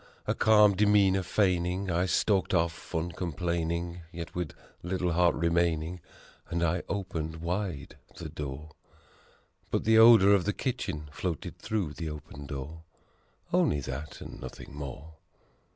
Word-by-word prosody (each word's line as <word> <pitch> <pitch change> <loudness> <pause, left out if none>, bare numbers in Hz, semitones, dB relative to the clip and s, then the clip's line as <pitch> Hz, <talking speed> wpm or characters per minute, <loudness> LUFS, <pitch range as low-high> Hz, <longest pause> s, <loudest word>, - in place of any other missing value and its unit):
Still, - - -1
a - - +2
calm 105 -2 +5
demeanor 100 -1 +4
feigning, 90 -1 0
I 85 +2 +1
stalked 95 -1 +2
off 85 0 -1
un 85 +2 -1
complaining, 85 +1 -2
Yet 85 0 -7
with 90 -4 -4 0.3
little 90 0 -1
heart 85 0 +3
remaining, 85 0 0 0.5
and 85 0 -1
I 85 +1 +1
opened 85 -5 -3
wide 85 -1 -4 0.2
the 85 -1 -6
door; 75 0 -6 1.0
But - - 0
the 110 0 +5
odor 110 -3 +8
of 95 -3 +3
the 105 - +1
kitchen 95 - -3
floated 85 +3 -4
through 100 -8 -2
the 80 +1 -5
open 75 -1 -9
door 70 +4 -6 0.7
Only 75 - +3
that 70 +3 -6
and - - -9
nothing - - -9
more. 75 +3 -8
85 Hz, 140 wpm, -29 LUFS, 80-95 Hz, 1.0 s, odor